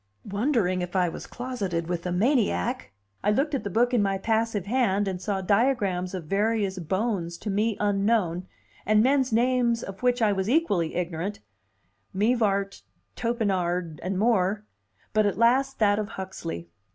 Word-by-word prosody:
Wondering 205 -4 0
if 180 +1 -5
I 180 -2 +3
was - - -8
closeted 205 -10 -3
with 175 +1 -3
a - - -2
maniac, 180 - +1 0.3
I 205 - +2
looked 275 +8 +1
at 275 - -1
the 200 - -3
book 240 +5 +2
in 240 - +4
my 195 -1 +1
passive 220 -1 0
hand, 205 -4 +1
and 185 -2 -3
saw 195 -2 -2
diagrams 200 -4 +1
of 180 - -5
various 200 +1 0
bones 180 -1 -2
to 210 - -4
me 210 +2 0
unknown, 200 -3 +1 0.4
and 215 0 +4
men's 265 0 +2
names 235 0 +2
of 195 +3 -8
which 250 0 +2
I 220 -3 +3
was 190 +1 -1
equally 205 - +1
ignorant 180 +3 -3 0.8
Mivart, 200 -2 +1 0.3
Topinard, 180 -8 -1
and 185 +1 -2
more, 210 -1 +1 0.5
but 215 -1 +3
at 200 - -1
last 260 +4 +3
that 205 -1 +3
of 210 0 -3
Huxley. 180 - -6
205 Hz, 160 wpm, -26 LUFS, 185-230 Hz, 0.8 s, in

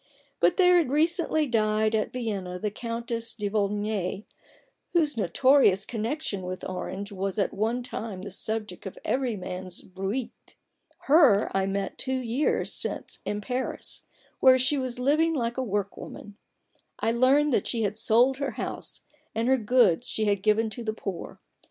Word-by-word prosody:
But 175 +1 +3
there 360 -1 +6
has 330 - +1
recently 315 +2 +2
died 215 -3 +1
at 215 -1 0
Vienna 200 -7 -3
the 210 +3 -2
Countess 230 +1 -4
de 210 -3 -2
Volnay, 205 -1 -1 0.7
whose 310 -5 +2
notorious 220 -1 +4
connection 225 -2 -3
with 185 0 -5
Orange 190 +2 -5
was 195 0 -3
at 200 - +1
one 230 +4 -1
time 215 -6 -5
the 200 - -7
subject 210 -1 -4
of 190 - -9
every 255 -3 0
man's 185 -1 -6
bruit. 195 +7 -5 0.5
Her 275 - +5
I 195 0 +2
met 195 0 -3
two 260 0 -1
years 255 +3 0
since - - -4
in 210 0 -2
Paris, 250 +5 -3 0.4
where 260 -1 +7
she 260 +3 +2
was 255 -2 -3
living 305 +6 +2
like 235 -2 -1
a - - +1
work 205 -3 -2
woman, 205 - -10 0.6
I 225 - +1
learned 265 +4 +4
that 205 - +1
she 230 -2 0
had 205 0 -1
sold 245 +4 +4
her 280 -1 -2
house, - - -5 0.3
and 225 +2 0
her 265 +1 +4
goods 225 -6 +3
she 215 - -1
had 200 -2 +1
given 215 +1 +2
to 240 - -6
the 220 -1 -2
poor. 195 -5 -6
225 Hz, 165 wpm, -27 LUFS, 200-255 Hz, 0.7 s, where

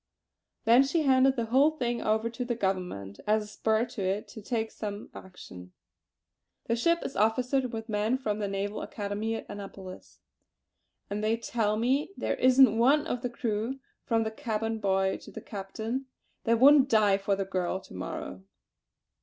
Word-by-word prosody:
Then 235 +3 +7
she 290 +4 +1
handed 265 -1 +4
the 235 -3 -1
whole 265 +6 +4
thing 240 -6 -2
over 220 +1 +1
to 230 +2 -4
the 240 -1 -2
Government 180 - -3
as 215 0 +3
a - - -11
spur 220 +2 0
to 235 -4 -7
it 195 +3 -1
to 220 - -10
take 225 +1 -2
some 205 -1 -6
action. 90 - -11 0.9
The 230 - +1
ship 335 +8 +1
is - - -5
officered 250 +4 +1
with 225 -1 -5
men 215 +3 0
from 215 -5 -2
the 205 - -1
Naval 200 +1 -3
Academy 210 +2 -3
at - - -6
Annapolis; 195 -2 -10 0.9
and 205 +1 -4
they 220 +1 +2
tell 220 -2 -1
me 265 - 0
there - - -1
isn't 255 -2 +5
one 285 +6 +4
of 245 -6 -3
the 245 - -2
crew 235 +1 -2 0.3
from 225 -1 +1
the 220 - -3
cabin 225 -2 -3
boy 190 -1 +1
to - - -13
the - - -7
captain 220 +6 -5 0.4
that 230 -1 +3
wouldn't 280 +1 +7
die 210 -4 +4
for 200 0 0
the 195 0 -2
girl 185 -1 -2
to - - -15
morrow." 95 0 -6
220 Hz, 175 wpm, -29 LUFS, 205-250 Hz, 0.9 s, Then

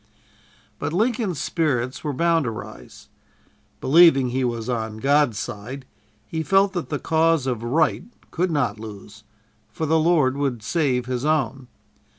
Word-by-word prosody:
But 155 - -3
Lincoln's 215 - 0
spirits 135 -7 -1
were 150 - -1
bound 165 +1 +1
to - - -1
rise. 85 - -10 0.7
Believing 140 -4 +5
he 130 +2 -1
was 120 -2 -2
"on 110 -3 -3
God's 140 -2 +2
side," 120 +5 -6 0.4
he 160 - -4
felt 195 +5 +3
that 175 -3 -4
the 145 - -1
cause 160 0 +1
of 125 -4 -2
Right 145 +7 +1 0.3
could 180 +2 0
not 125 -9 -1
lose, 110 0 -10 0.5
for 160 - -4
the 160 +1 +2
Lord 155 -5 +3
would 135 -6 -2
save 130 -4 0
His 125 0 -3
own. 135 -4 0
140 Hz, 150 wpm, -23 LUFS, 120-160 Hz, 0.7 s, Believing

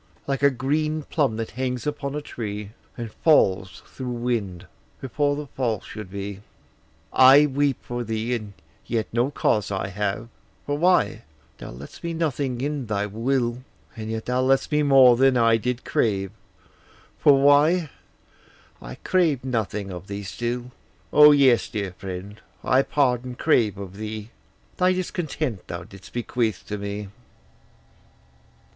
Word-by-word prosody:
Like 135 -1 -2
a 140 - +6
green 150 +4 -1
plum 140 -7 0
that 115 -1 -4
hangs 125 -2 -3
upon 145 -1 -3
a 150 - -4
tree, 105 -5 -6 0.3
And 115 -2 -5
falls, 95 - +2
through 130 - -8
wind, 120 -7 -2 0.3
before 145 +2 0
the 150 +1 -5
fall 120 -6 -2
should 105 -2 -9
he. 100 0 -6 0.7
I 135 +3 +8
weep 140 -1 +1
for 120 0 -4
thee, 115 +2 -2
and 105 -4 -4 0.3
yet 110 -2 0
no 120 +3 +2
cause 105 -7 0
I 95 0 -2
have; 105 +3 -3 0.4
For 145 - -1
why 170 -8 +2 0.4
thou - - -8
left'st 65 - -11
me 170 -1 -3
nothing 140 -6 -1
in 145 -3 -3
thy 105 -1 -1
will: 120 +3 -1 0.3
And 110 -2 -6
yet 110 0 -4
thou 125 +1 0
left'st 135 +3 +2
me 150 0 +3
more 135 -4 +7
than 130 +1 +4
I 115 -1 +4
did 125 +2 -3
crave; 95 -3 0 0.9
For 140 -2 +6
why 145 +4 +4 0.9
I - - -8
craved 160 -9 +1
nothing 105 -5 -2
of 90 +1 -8
thee 100 0 -5
still: 120 +5 -4 0.4
O 150 0 +9
yes, 135 -5 +4
dear 100 -4 -4
friend, 95 +3 -8 0.2
I 130 - +4
pardon 125 -3 0
crave 115 -9 +2
of 100 -1 -8
thee, 110 +1 -6 0.5
Thy 185 0 +3
discontent 160 - -3
thou 85 0 -6
didst 95 0 -14
bequeath 120 -3 -2
to 105 0 -3
me. 100 0 -5
120 Hz, 150 wpm, -24 LUFS, 105-140 Hz, 0.9 s, O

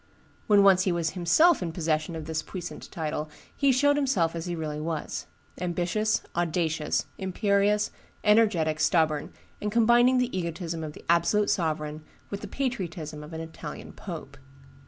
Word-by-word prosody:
When 205 -3 +6
once 190 -2 +6
he 185 - +2
was 170 -2 0
himself 195 - +4
in 170 -3 -3
possession 160 -1 -1
of 160 -1 -5
this 160 0 -2
puissant 175 +1 -7
title 155 -1 -3 0.3
he 280 -1 +3
showed 285 +3 +3
himself 200 - +1
as 165 +1 -4
he 175 - -2
really 155 -2 -4
was; 160 -1 -4 0.3
ambitious, 180 +5 0
audacious, 160 -2 0
imperious, 200 +2 +1 0.3
energetic, 205 -8 +3
stubborn, 155 -2 +2 0.3
and 210 - -2
combining 240 +3 +5
the 250 -3 0
egotism 170 -2 -3
of 150 -1 -5
the - - -14
absolute 170 +5 +3
sovereign 155 -3 -1 0.3
with 200 - -4
the - - -6
patriotism 170 - -4
of 150 - -10
an 160 0 -5
Italian 160 -2 -8
pope. 155 -7 -8
170 Hz, 155 wpm, -27 LUFS, 160-210 Hz, 0.3 s, When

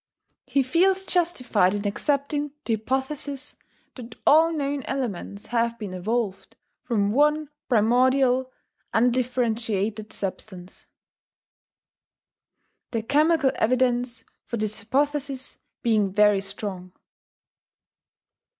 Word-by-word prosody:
He 275 - +2
feels 375 +8 +2
justified 250 - +1
in 205 0 -4
accepting 285 +5 -1
the 230 - 0
hypothesis 265 +5 -3 0.4
that 235 -3 -10
all 320 +3 +6
known 285 -3 -2
elements 210 -6 -4
have 235 0 0
been 205 -5 -6
evolved 205 +2 -3 0.3
from 205 -4 0
one 300 +4 +2 0.2
primordial 255 +3 +3 0.4
undifferentiated 225 -3 0
substance, 185 -1 -7 2.0
the 225 -2 -2
chemical 300 +2 +3
evidence 245 0 +1 0.2
for 235 - -4
this 215 0 -1
hypothesis 275 +3 -1 0.2
being 215 -4 +2
very 210 0 +4
strong. 190 -2 -6
245 Hz, 90 wpm, -25 LUFS, 215-275 Hz, 2.0 s, all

